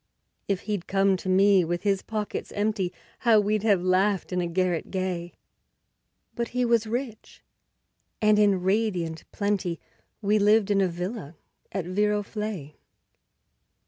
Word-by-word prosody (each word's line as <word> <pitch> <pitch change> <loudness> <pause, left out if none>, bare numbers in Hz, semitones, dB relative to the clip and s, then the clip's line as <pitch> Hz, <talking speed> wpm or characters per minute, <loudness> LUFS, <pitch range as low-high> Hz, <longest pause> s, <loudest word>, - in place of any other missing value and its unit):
If 195 -2 0
he'd 205 -4 -3
come 195 0 +3
to 185 - -5
me 195 0 +5
with 175 +1 -2
his 200 -2 +1
pockets 215 -2 -4
empty, 205 -3 0 0.3
How 230 -3 +5
we'd 210 0 +1
have 200 -4 +2
laughed 190 +1 +1
in 180 - +1
a 175 - -1
garret 175 -1 -1
gay! 185 -2 -3 1.0
But 235 0 -2
he 250 - +3
was 235 -2 +2
rich, 235 -1 -5 0.8
and 215 -1 +4
in 200 -3 +3
radiant 185 -5 0
plenty 200 -5 -1 0.4
We 210 0 +2
lived 210 0 +4
in 195 -1 +3
a 190 - +3
villa 180 -1 -5 0.4
at 190 -3 -3
Viroflay. 205 -4 -2
200 Hz, 140 wpm, -26 LUFS, 180-210 Hz, 1.0 s, me